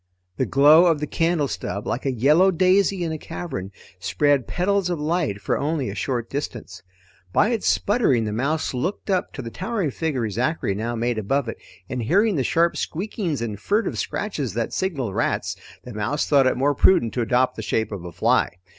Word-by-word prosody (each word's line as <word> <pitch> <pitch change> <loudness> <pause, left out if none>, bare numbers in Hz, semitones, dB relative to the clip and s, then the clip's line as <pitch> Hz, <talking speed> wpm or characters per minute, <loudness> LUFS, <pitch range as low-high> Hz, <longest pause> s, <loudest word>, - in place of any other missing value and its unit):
The 130 - 0
glow 150 +6 +6
of 165 -3 +2
the 150 - -2
candle 165 -1 0
stub, 100 -5 -4
like 130 - -2
a - - +2
yellow 150 - +4
daisy 185 +1 +2
in 165 - -2
a 155 - -4
cavern, 135 - -6 0.3
spread 145 - +1
petals 195 +1 0
of 175 -3 -2
light 155 - -1
for 100 - -1
only 145 -6 -1
a - - -6
short 115 +4 -2
distance. 120 -9 -6 0.5
By 215 - +3
its 230 -4 -1
sputtering, 170 - +2
the 105 - -2
mouse 140 +9 -1
looked 180 +10 -3
up 185 - 0
to 135 - -6
the 115 - -7
towering 190 - -2
figure 135 -6 -2
Zachary 120 - -1
now 115 +4 -3
made 120 0 -1
above 130 +5 0
it, 115 - -5 0.3
and 130 -2 -3
hearing 200 - +2
the 135 - +1
sharp 170 +5 +2
squeakings 175 - -3
and 105 -3 -4
furtive 210 - 0
scratches 145 - -3
that 115 -1 -2
signaled 140 - -2
rats, - - -1 0.3
the 125 - -9
mouse 120 +8 -1
thought 140 -3 +4
it - - +1
more 140 +3 +2
prudent 125 -5 +3
to 125 - -1
adopt 125 +2 +1
the - - -5
shape 110 0 -1
of 100 -4 -6
a 90 - -7
fly. 85 - +1
140 Hz, 200 wpm, -23 LUFS, 115-175 Hz, 0.5 s, glow